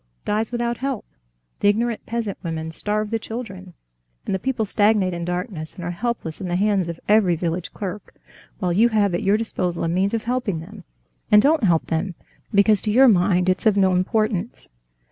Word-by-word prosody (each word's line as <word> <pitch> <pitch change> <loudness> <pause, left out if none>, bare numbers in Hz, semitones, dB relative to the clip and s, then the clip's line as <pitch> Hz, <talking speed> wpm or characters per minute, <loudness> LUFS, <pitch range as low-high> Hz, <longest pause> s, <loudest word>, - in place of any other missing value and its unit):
"...dies 215 +2 0
without 240 -1 -1
help? 265 -4 -3 0.5
The - - +2
ignorant 230 +2 0
peasant 225 -4 -3
women 160 -1 -4
starve 210 +5 -2
the 225 - 0
children, 195 -6 -7 0.5
and - - -2
the 190 - 0
people 240 +1 -1
stagnate 205 -2 +2
in 170 0 -4
darkness, 175 -2 -4
and 180 - -8
are 175 - -3
helpless 190 -4 -3
in 185 - -3
the 175 - -1
hands 195 -2 +1
of 170 -1 -6
every 205 -5 +4
village 170 +1 -3
clerk, 200 0 -7 0.4
while 180 -3 -1
you 225 +6 +4
have 205 -4 +2
at 175 - -1
your 200 +2 +3
disposal 180 -6 -1
a - - 0
means 190 +6 +1
of 225 - -2
helping 240 -8 -1
them, 160 - -11 0.4
and 210 - +7
don't 285 +1 +3
help 170 -4 +2
them 170 +3 -2 0.4
because 200 0 +4
to 215 - -2
your 260 +5 +6
mind 180 -3 +3
it's 185 +4 +1
of 205 -2 +3
no 190 -2 +4
importance." 210 +3 -1
200 Hz, 195 wpm, -22 LUFS, 180-220 Hz, 0.5 s, and